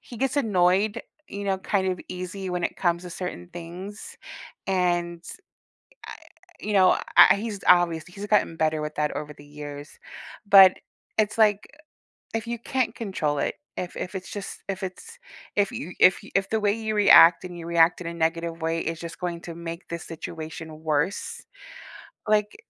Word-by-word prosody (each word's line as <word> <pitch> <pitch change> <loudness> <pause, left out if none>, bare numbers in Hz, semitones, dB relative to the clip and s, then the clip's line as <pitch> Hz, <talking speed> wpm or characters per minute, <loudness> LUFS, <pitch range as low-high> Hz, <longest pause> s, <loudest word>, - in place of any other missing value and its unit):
he 240 - -11
gets 270 +4 -1
annoyed, 205 -2 +2 0.3
you 200 0 -6
know, 195 -1 0
kind 190 0 0
of 180 - -4
easy 185 +1 -5
when 180 -1 -2
it - - -3
comes 170 -1 0
to 180 - -8
certain 165 - -6
things, 180 +5 -9 0.5
and, 175 -2 0 0.8
I - - -7 0.5
you 210 - -3
know, 190 -2 +5 0.2
I - - +9
he's 210 -1 -5
obvious 170 -3 +4
he's 195 +3 -8
gotten 210 -5 +2
better 155 -1 +1
with 150 0 -5
that 150 0 0
over 150 0 -5
the 145 - -14
years, 145 0 -9 0.5
but, 195 -2 +9 0.4
it's 215 +1 +1
like, 210 -2 +3 0.7
if 225 0 -2
you 235 0 -3
can't 240 -1 -1
control 160 -9 -2
it, - - -1 0.2
if 180 - -5
if 185 - -5
it's 190 -1 -6
just 205 -2 -7
if 195 0 -4
it's 325 - -7 0.4
if 205 -1 +2
you 175 +4 -6
if 185 - +5
you - - -13
if 195 0 +1
the 220 - +1
way 205 -1 +2
you 220 -1 -3
react 180 -5 +7
and 180 -1 -7
you 170 - -8
react 170 +1 +3
in - - -8
a 170 - -3
negative 165 0 -1
way 165 0 0
is 165 0 -4
just 170 0 -8
going 175 -1 -4
to 170 - -7
make 170 +1 -7
this 170 -1 -5
situation 160 -1 -8
worse, 155 +4 -1 0.9
like, 210 -1 +2
180 Hz, 180 wpm, -25 LUFS, 165-200 Hz, 0.9 s, I